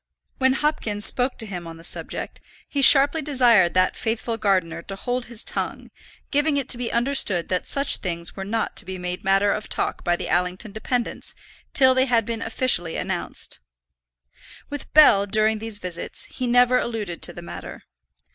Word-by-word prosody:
When 260 -1 +3
Hopkins 225 -8 -1
spoke 255 +1 +1
to 225 - 0
him 180 -5 -7
on 165 0 -10
the 165 - -14
subject, - - 0 0.3
he 285 - -2
sharply 280 +3 +7
desired 240 - +3
that 185 0 +2
faithful 225 0 -3
gardener 185 -6 -1
to 195 +3 -7
hold 245 +5 -4
his 235 -2 -4
tongue, - - -5 0.4
giving 290 0 +1
it 275 -2 -2
to 245 - +8
be 245 - -3
understood 235 -8 +1
that 180 -1 -1
such 280 -1 +3
things 170 -2 -3
were 195 - -6
not 220 +3 -3
to - - -1
be 190 0 -7
made 180 0 -5
matter 195 +1 +2
of 210 - -4
talk - - -3
by 175 -1 +1
the - - -5
Allington 180 +4 -2
dependants 235 +3 -3 0.4
till 260 -2 +5
they 260 0 +2
had 235 -4 +1
been 230 0 -5
officially 225 -8 +1
announced. - - -4 1.1
With 290 -1 -7
Bell 200 -10 +6
during 215 +1 +1
these 220 -1 0
visits 180 -4 -4
he 255 - -5
never 245 +1 +3
alluded 210 -8 -5
to - - 0
the 175 0 -11
matter. - - -10
220 Hz, 180 wpm, -22 LUFS, 185-255 Hz, 1.1 s, to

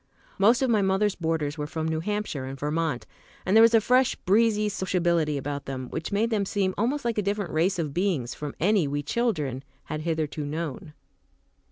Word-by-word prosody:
Most 230 +6 +5
of 260 - +1
my 215 -2 +3
mother's 195 +1 +2
boarders 160 -4 -2
were 150 - -2
from 160 +1 -3
New 160 0 -1
Hampshire 205 -7 -3
and 135 +1 -7
Vermont, 150 -2 -1 0.4
and 190 - +2
there 225 - +8
was 230 0 +6
a - - +7
fresh, 250 +4 +3
breezy 210 +2 +2
sociability 175 -6 0
about 140 +1 -4
them 130 -2 -5
which 165 - -4
made 220 +3 +1
them 210 -2 +1
seem 195 -1 0
almost 255 +6 -1
like 230 -2 0
a - - +2
different 200 -1 -2
race 175 +5 +2
of 155 -5 -2
beings 175 -9 0
from 150 -1 -6
any 190 -2 +3
we 145 +1 -2
children 150 - -1 0.2
had 155 -1 -5
hitherto 155 -2 -2
known. 150 0 -5
170 Hz, 195 wpm, -26 LUFS, 150-210 Hz, 0.4 s, there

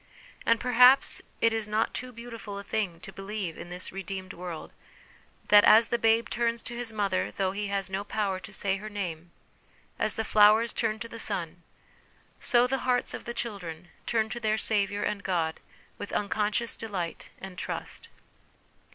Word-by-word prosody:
And 230 0 +4
perhaps 250 +2 +6 0.2
it 230 0 +4
is 220 -2 -1
not 215 +1 0
too 255 +1 -5
beautiful 230 -3 -8
a 200 - -6
thing 195 -5 -2
to - - -10
believe 195 -4 -4
in 175 - -9
this 180 +1 -3
redeemed 190 0 -6
world, 175 -2 -7 0.8
that, 205 0 +8
as 225 +1 +7
the 235 - +1
babe 225 +1 +3
turns 235 -1 0
to 240 - -6
his 240 -1 -3
mother 200 - 0
though 190 -1 +1
he 205 +1 -3
has 200 -1 -1
no 195 +1 -3
power 205 -2 -1
to 185 +2 -11
say 195 -1 0
her 215 +2 -7
name, 175 -5 -5 0.7
as 215 - +1
the 220 - -1
flowers 215 +2 +5
turn 220 -2 0
to 230 - -4
the 230 0 -9
sun, 175 -4 -2 0.8
so 240 0 +4
the 265 +1 0
hearts 250 0 +1
of - - -7
the 235 - -4
children 175 -8 -5 0.2
turn 220 -2 +1
to 240 - -4
their 215 -1 +1
Saviour 205 -2 +1
and 205 -1 -1
God 165 -4 -1 0.4
with 205 - -6
unconscious 210 +3 0
delight 190 -7 -5
and 190 -1 -8
trust. - - -6
210 Hz, 175 wpm, -28 LUFS, 190-230 Hz, 0.8 s, that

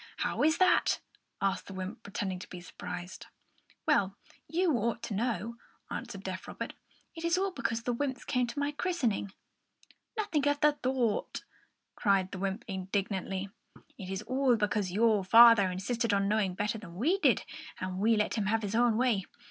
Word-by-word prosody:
How - - -1
is 315 +2 +4
that?" 370 -1 +4 0.4
asked 195 0 0
the 195 - -8
wymp, 190 +5 -5
pretending 195 -3 -4
to - - -10
be 180 - -7
surprised. 175 0 -8 0.6
"Well, 195 0 +2 0.3
you 345 -1 +1
ought 230 +1 -1
to 235 - -4
know," 230 +1 -2 0.3
answered - - -6
deaf - - -5
Robert. - - -5 0.4
"It 325 - -7
is 335 +1 +2
all 390 +1 0
because 235 -7 -2
the 245 - 0
wymps 260 0 -3
came 250 -3 +1
to 240 - -7
my 285 0 0
christening." 285 - -1 0.9
"Nothing 340 -10 0
of 290 0 +2
the 300 -1 +4
sort!" 250 -4 0 0.5
cried 195 -3 +2
the 185 - -6
wymp, 195 +2 -2
indignantly. 195 0 -2 0.5
"It 185 - -8
is 190 +2 -3
all 260 0 +2
because 210 -3 0
your 215 0 +3
father 230 -1 +8
insisted 205 +4 0
on 195 0 +1
knowing 205 -3 +1
better 210 +3 -1
than 175 -5 -11
we 320 - +1
did, - - +3 0.4
and 185 0 -4
we 225 +3 +4
let 210 - +1
him 200 - 0
have 220 +1 +1
his 205 0 -3
own 235 -1 +3
way. 230 -6 +2
220 Hz, 175 wpm, -31 LUFS, 195-255 Hz, 0.9 s, father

